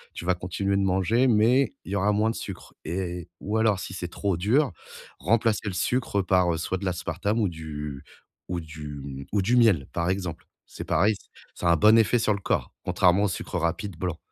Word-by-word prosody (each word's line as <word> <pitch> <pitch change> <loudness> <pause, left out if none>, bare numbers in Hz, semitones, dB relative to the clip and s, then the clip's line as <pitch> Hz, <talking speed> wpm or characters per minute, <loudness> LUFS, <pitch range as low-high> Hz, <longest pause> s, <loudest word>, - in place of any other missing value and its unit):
tu - - -6
vas 90 - +3
continuer 95 +3 -2
de 100 - +2
manger 95 +7 +2
mais 120 +4 +4
il - - -7
y - - 0
aura 100 +1 +2
moins 110 +2 +2
de - - -7
sucre - - -8
et 90 0 -4
ou 105 +2 -2
alors, 110 -3 +3
si 95 - -6
c'est 90 -2 -4
trop 95 +2 -1
dur, 110 - +2 0.5
remplacer 110 - +1
le 100 - -2
sucre 100 +1 0
par, 90 -1 +3
heu, - - -2
soit 90 +3 -2
de 100 - -5
l'aspartame 95 +4 -1
ou 105 - +2
du 75 -3 -6 0.4
ou 90 0 -2
du 80 -2 -8
m 70 -1 -7
ou 100 - +2
du 115 +6 +2
miel, 110 - +4
par 85 0 0
exemple. 90 -3 -3 0.2
C'est - - -8
pareil 100 +7 +3
c - - -15 0.3
ça 85 - -3
a - - +6
un - - +4
bon 105 +7 +6
effet 115 +2 +3
sur 110 -2 +2
le 100 - -3
corps, - - -1
contrairement 90 +2 +3
au - - +3
sucre 90 -1 -4
rapide 85 +2 -2
blanc. 90 -3 -2
95 Hz, 220 wpm, -26 LUFS, 85-105 Hz, 0.5 s, a